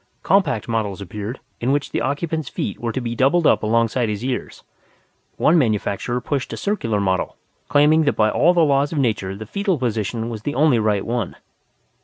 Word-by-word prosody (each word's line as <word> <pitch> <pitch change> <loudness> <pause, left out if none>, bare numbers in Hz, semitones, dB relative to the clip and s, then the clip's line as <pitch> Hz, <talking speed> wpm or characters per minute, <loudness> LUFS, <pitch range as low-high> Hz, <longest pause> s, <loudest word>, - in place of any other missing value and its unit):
Compact 190 - +2
models 110 -4 -2
appeared, 105 +5 -6 0.2
in 125 +3 0
which 145 0 -1
the - - -1
occupant's 155 +1 -2
feet 100 - -4
were 120 -1 -2
to 120 - -2
be 120 -2 -3
doubled 140 +8 +2
up - - +4
alongside 115 +2 +1
his 105 +3 -3
ears. 130 -1 -4 0.7
One 165 +2 +4
manufacturer 115 0 0
pushed 135 +2 -3
a - - -5
circular 115 - -1
model, 95 -2 -1 0.3
claiming 150 +2 +4
that 145 - +2
by 110 -1 +3
all 175 +3 +3
the 170 -2 +5
laws 140 0 +2
of 160 - -3
nature 105 -8 0
the 110 +2 -8
foetal 200 - -1
position 115 -2 -2
was 115 -3 -5
the 145 +6 -3
only 145 -4 +4
right 105 -2 +1
one. 115 -4 -2
120 Hz, 190 wpm, -21 LUFS, 110-145 Hz, 0.7 s, the